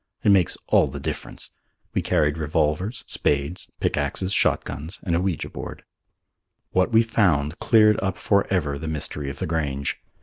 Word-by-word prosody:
It 105 Hz, -, +5 dB
makes 95 Hz, -4 st, +3 dB
all -, -, +4 dB
the 70 Hz, +2 st, -6 dB
difference. 70 Hz, -, -5 dB, 0.4 s
We -, -, +1 dB
carried 75 Hz, 0 st, +1 dB
revolvers, 80 Hz, -, 0 dB
spades, 75 Hz, +5 st, 0 dB
pickaxes, 95 Hz, +1 st, -1 dB
shotguns 80 Hz, +1 st, 0 dB
and 85 Hz, -3 st, 0 dB
an 85 Hz, -, +1 dB
ouija 95 Hz, -4 st, -1 dB
board. -, -, -8 dB, 0.9 s
What 95 Hz, +4 st, +2 dB
we 115 Hz, 0 st, +5 dB
found 85 Hz, -9 st, +1 dB
cleared 110 Hz, -2 st, +5 dB
up 95 Hz, -1 st, -1 dB
for 100 Hz, -1 st, +1 dB
ever 75 Hz, -7 st, 0 dB
the 80 Hz, -, -5 dB
mystery 75 Hz, -2 st, -3 dB
of 70 Hz, -, -7 dB
the -, -, -2 dB
Grange. 70 Hz, -4 st, -2 dB
80 Hz, 160 wpm, -24 LUFS, 75-95 Hz, 0.9 s, It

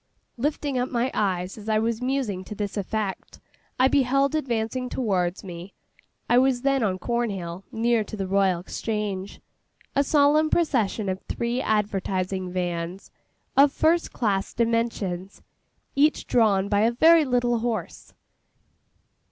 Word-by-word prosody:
Lifting 285 Hz, 0 st, -1 dB
up 250 Hz, -, -1 dB
my 245 Hz, +1 st, 0 dB
eyes, 190 Hz, -1 st, -1 dB
as 215 Hz, +1 st, -7 dB
I 215 Hz, -, +3 dB
was 225 Hz, +1 st, -1 dB
musing 250 Hz, -8 st, -1 dB
to 210 Hz, -, -7 dB
this 205 Hz, -1 st, -4 dB
effect, 205 Hz, -1 st, -4 dB, 0.4 s
I 260 Hz, -, +6 dB
beheld 275 Hz, +1 st, +2 dB
advancing 250 Hz, -3 st, -2 dB
towards 185 Hz, -8 st, -1 dB
me 180 Hz, 0 st, -9 dB, 0.5 s
(I 240 Hz, -, +5 dB
was 260 Hz, -1 st, +2 dB
then 275 Hz, -1 st, +2 dB
on 195 Hz, -4 st, 0 dB
Cornhill, 195 Hz, -5 st, -3 dB
near 230 Hz, 0 st, +1 dB
to 215 Hz, -, -8 dB
the 195 Hz, -, -2 dB
Royal 190 Hz, -2 st, +2 dB
Exchange), 205 Hz, -1 st, -4 dB, 0.5 s
a 280 Hz, -, +4 dB
solemn 295 Hz, +2 st, +3 dB
procession 230 Hz, -, +1 dB
of 190 Hz, 0 st, -2 dB
three 240 Hz, +2 st, -1 dB
advertising 190 Hz, -4 st, -1 dB
vans, 175 Hz, 0 st, -4 dB, 0.4 s
of 280 Hz, +1 st, +6 dB
first 330 Hz, +4 st, +2 dB
class 200 Hz, -5 st, -1 dB
dimensions, 225 Hz, -5 st, -1 dB, 0.5 s
each 300 Hz, +3 st, +2 dB
drawn 205 Hz, -5 st, +3 dB
by 205 Hz, 0 st, +1 dB
a 225 Hz, +3 st, +3 dB
very 320 Hz, +6 st, +6 dB
little 245 Hz, -3 st, +1 dB
horse. 230 Hz, -1 st, -4 dB
220 Hz, 135 wpm, -25 LUFS, 195-255 Hz, 0.5 s, I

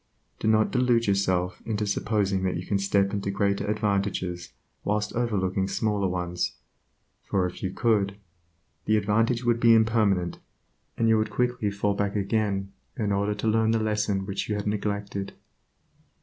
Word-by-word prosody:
Do -, -, -2 dB
not 110 Hz, 0 st, +3 dB
delude 125 Hz, -2 st, +2 dB
yourself 95 Hz, -2 st, 0 dB
into 105 Hz, -2 st, -2 dB
supposing 100 Hz, -1 st, 0 dB
that 95 Hz, -2 st, -1 dB
you 90 Hz, -, -6 dB
can 100 Hz, -, 0 dB
step 100 Hz, 0 st, +1 dB
into 100 Hz, -1 st, -2 dB
greater 100 Hz, +1 st, 0 dB
advantages 100 Hz, -4 st, -1 dB, 0.3 s
whilst 105 Hz, 0 st, -1 dB
overlooking 95 Hz, -5 st, 0 dB
smaller 105 Hz, -1 st, 0 dB
ones, 90 Hz, -1 st, -2 dB, 0.7 s
for 95 Hz, -2 st, 0 dB
if 90 Hz, -, -6 dB
you 95 Hz, -, -1 dB
could, 100 Hz, -1 st, +1 dB, 0.7 s
the 110 Hz, -, +3 dB
advantage 115 Hz, +4 st, +1 dB
would 120 Hz, -1 st, +2 dB
be 115 Hz, -1 st, +6 dB
impermanent 105 Hz, -6 st, +2 dB, 0.6 s
and 115 Hz, -, +2 dB
you 110 Hz, -1 st, +4 dB
would 110 Hz, 0 st, 0 dB
quickly 125 Hz, -1 st, 0 dB
fall 100 Hz, 0 st, 0 dB
back 100 Hz, 0 st, -1 dB
again 100 Hz, -1 st, -1 dB, 0.2 s
in 105 Hz, -4 st, 0 dB
order 100 Hz, +1 st, 0 dB
to 105 Hz, +2 st, -3 dB
learn 110 Hz, 0 st, +3 dB
the 115 Hz, 0 st, +2 dB
lesson 105 Hz, -3 st, 0 dB
which 100 Hz, +1 st, -4 dB
you 105 Hz, -, 0 dB
had 105 Hz, -, -3 dB
neglected. 100 Hz, -1 st, -3 dB
100 Hz, 160 wpm, -26 LUFS, 100-110 Hz, 0.7 s, be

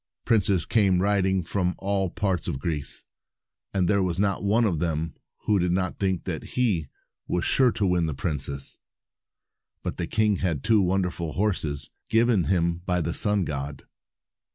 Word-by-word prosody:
Princes 100 Hz, -6 st, +2 dB
came 100 Hz, -5 st, +3 dB
riding 95 Hz, -1 st, +2 dB
from 90 Hz, +1 st, -1 dB
all 100 Hz, -1 st, 0 dB
parts 95 Hz, -1 st, -1 dB
of 80 Hz, -6 st, -2 dB
Greece, 75 Hz, -2 st, -3 dB, 0.7 s
and 95 Hz, -3 st, +1 dB
there 100 Hz, +2 st, +3 dB
was 90 Hz, -2 st, -1 dB
not 100 Hz, 0 st, 0 dB
one 110 Hz, +4 st, +3 dB
of 85 Hz, -7 st, 0 dB
them 80 Hz, -1 st, -1 dB, 0.3 s
who 105 Hz, -2 st, +2 dB
did 90 Hz, 0 st, +1 dB
not 95 Hz, -1 st, -1 dB
think 95 Hz, -3 st, 0 dB
that -, -, -5 dB
he 95 Hz, -, +1 dB, 0.4 s
was 90 Hz, -, -1 dB
sure 130 Hz, -2 st, +4 dB
to 105 Hz, -3 st, 0 dB
win 90 Hz, -3 st, +2 dB
the 75 Hz, -, -3 dB
princess. 70 Hz, -3 st, -4 dB, 1.0 s
But -, -, -4 dB
the -, -, -2 dB
king 105 Hz, -2 st, +2 dB
had 85 Hz, -7 st, -1 dB
two 110 Hz, -2 st, +4 dB
wonderful 90 Hz, -3 st, -1 dB
horses, 80 Hz, -8 st, -2 dB, 0.2 s
given 115 Hz, -5 st, +3 dB
him 85 Hz, -2 st, +1 dB
by 90 Hz, 0 st, -1 dB
the 85 Hz, +1 st, -2 dB
sun 105 Hz, -3 st, +4 dB
god. 70 Hz, -1 st, -5 dB
90 Hz, 165 wpm, -26 LUFS, 85-100 Hz, 1.0 s, sure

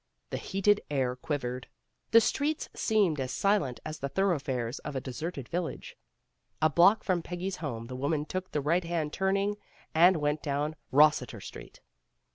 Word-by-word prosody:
The -, -, -1 dB
heated 200 Hz, +2 st, +2 dB
air 130 Hz, -3 st, 0 dB
quivered. 125 Hz, -2 st, -4 dB, 0.4 s
The 230 Hz, -, +7 dB
streets 290 Hz, +6 st, -1 dB
seemed 200 Hz, -, +2 dB
as 130 Hz, -1 st, -2 dB
silent 195 Hz, -11 st, +1 dB
as 155 Hz, 0 st, -5 dB
the 140 Hz, -, -3 dB
thoroughfares 135 Hz, -10 st, -1 dB
of 145 Hz, -, -7 dB
a -, -, 0 dB
deserted 135 Hz, +1 st, -5 dB
village. 175 Hz, -1 st, -4 dB, 0.6 s
A 155 Hz, 0 st, +3 dB
block 185 Hz, +8 st, +5 dB
from 180 Hz, -3 st, +1 dB
Peggy's 180 Hz, +2 st, -4 dB
home, 120 Hz, -8 st, -5 dB
the 125 Hz, +2 st, -7 dB
woman 145 Hz, +3 st, -1 dB
took 185 Hz, +3 st, -4 dB
the 150 Hz, -, -1 dB
right 170 Hz, +6 st, +1 dB
hand 165 Hz, -3 st, -2 dB
turning 195 Hz, +2 st, 0 dB, 0.4 s
and 175 Hz, +3 st, +6 dB
went 150 Hz, 0 st, 0 dB
down 150 Hz, +1 st, -1 dB, 0.2 s
Eossiter 140 Hz, -5 st, +4 dB
Street. -, -, -11 dB
155 Hz, 160 wpm, -29 LUFS, 135-185 Hz, 0.6 s, The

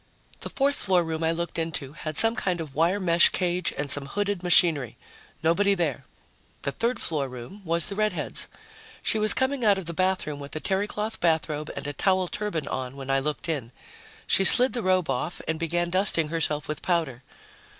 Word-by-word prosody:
The -, -, -5 dB
fourth 280 Hz, +1 st, 0 dB
floor 185 Hz, -2 st, +2 dB
room 160 Hz, 0 st, -4 dB
I 160 Hz, -, +2 dB
looked 170 Hz, 0 st, -3 dB
into 160 Hz, -4 st, -4 dB
had 155 Hz, -1 st, -6 dB
some 225 Hz, 0 st, +5 dB
kind 180 Hz, -7 st, -1 dB
of 155 Hz, -4 st, -6 dB
wire 170 Hz, +7 st, +1 dB
mesh 170 Hz, -2 st, +5 dB
cage 180 Hz, -1 st, -1 dB
and 140 Hz, -1 st, -2 dB
some 140 Hz, -1 st, +3 dB
hooded 205 Hz, +2 st, -2 dB
machinery. 165 Hz, -, +3 dB, 0.5 s
Nobody 200 Hz, +5 st, +3 dB
there. 165 Hz, -8 st, -2 dB, 0.6 s
The 140 Hz, -, -1 dB
third 235 Hz, -, -2 dB
floor 145 Hz, -4 st, -1 dB
room 125 Hz, +11 st, -10 dB
was 170 Hz, -1 st, -1 dB
the -, -, -5 dB
redhead's. 215 Hz, +1 st, -1 dB, 0.6 s
She 220 Hz, -, +2 dB
was 215 Hz, 0 st, +6 dB
coming 260 Hz, -1 st, 0 dB
out 205 Hz, -3 st, +4 dB
of 190 Hz, -, -5 dB
the 170 Hz, -, -5 dB
bathroom 185 Hz, -5 st, -1 dB
with 140 Hz, +1 st, -9 dB
a -, -, -2 dB
terrycloth 205 Hz, +4 st, -2 dB
bathrobe 155 Hz, -2 st, 0 dB
and -, -, -6 dB
a 145 Hz, -, -3 dB
towel 185 Hz, +4 st, +1 dB
turban 170 Hz, -7 st, -4 dB
on 130 Hz, 0 st, -4 dB
when 135 Hz, -1 st, -5 dB
I 135 Hz, -, +3 dB
looked 150 Hz, +3 st, -3 dB
in. 140 Hz, -8 st, -3 dB, 0.5 s
She 195 Hz, -, +3 dB
slid 250 Hz, +6 st, +6 dB
the 240 Hz, -, -1 dB
robe 185 Hz, -3 st, +1 dB
off 135 Hz, +6 st, -3 dB
and 160 Hz, 0 st, -2 dB
began 175 Hz, +1 st, -1 dB
dusting 185 Hz, -4 st, +2 dB
herself 155 Hz, -2 st, 0 dB
with 150 Hz, 0 st, -4 dB
powder. 160 Hz, -8 st, -1 dB
170 Hz, 195 wpm, -26 LUFS, 150-195 Hz, 0.6 s, was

